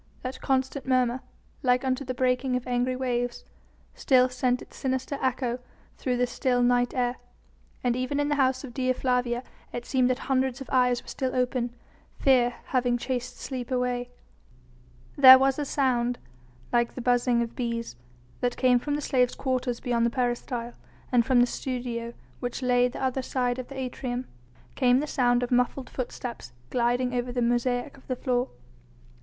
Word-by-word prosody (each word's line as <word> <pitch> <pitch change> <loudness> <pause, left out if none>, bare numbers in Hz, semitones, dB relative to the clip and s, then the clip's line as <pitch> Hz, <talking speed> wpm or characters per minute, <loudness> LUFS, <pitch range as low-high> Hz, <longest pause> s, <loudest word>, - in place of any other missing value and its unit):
That 255 +1 -5
constant 265 0 -1
murmur 255 -1 +2 0.4
like 250 +1 +2
unto 260 +1 0
the 255 -1 -4
breaking 250 0 +1
of 250 - -2
angry 250 +1 0
waves 245 -1 -2 0.5
still 255 -1 +4
sent 250 0 0
its - - -13
sinister 260 +1 -2
echo 255 -1 0 0.4
through 250 -2 -1
the 250 - +3
still 245 0 0
night 245 0 +2
air, 245 -1 0 0.7
and 245 -1 +2
even 255 +3 -1
in 290 - +1
the 295 - +1
house 260 +1 +1
of 255 -4 -8
Dea 255 0 +1
Flavia 250 -1 0 0.3
it 240 0 -5
seemed 255 -2 +2
that 255 - +1
hundreds 265 -1 +1
of 270 - -9
eyes 250 -2 +3
were - - -24
still 260 -2 -3
open, 250 -1 0 0.4
fear 245 -3 +3
having 245 -2 +1
chased 245 0 -4
sleep 250 -3 -5
away. 250 -1 -1 1.1
There 260 -2 +11
was 270 +1 +2
a 295 - -1
sound 245 -3 +1 0.6
like 235 0 +2
the 255 - -5
buzzing 245 -1 +2
of 230 - -7
bees 235 - -3 0.4
that 245 -1 -1
came 250 -1 +4
from 290 +3 -2
the 295 - -2
slaves' 250 -3 +2
quarters 255 -2 -1
beyond 235 -1 +1
the - - +1
peristyle, 240 -1 -2 0.4
and 245 -2 +4
from 245 0 +4
the - - +6
studio, 240 -2 -4 0.2
which 245 +1 -4
lay 245 0 +4
the 250 - -6
other 265 0 0
side 250 -1 -1
of 250 - -6
the 275 - -9
atrium, 250 -1 -3 0.5
came 250 -2 +4
the 295 - -1
sound 245 -4 +2
of 245 - -3
muffled 250 +1 +1
footsteps 240 - -6 0.2
gliding 245 +1 +1
over 245 0 -1
the 245 - -2
mosaic 245 +3 0
of 265 - -20
the 255 - -1
floor. 250 0 0
250 Hz, 175 wpm, -27 LUFS, 245-260 Hz, 1.1 s, There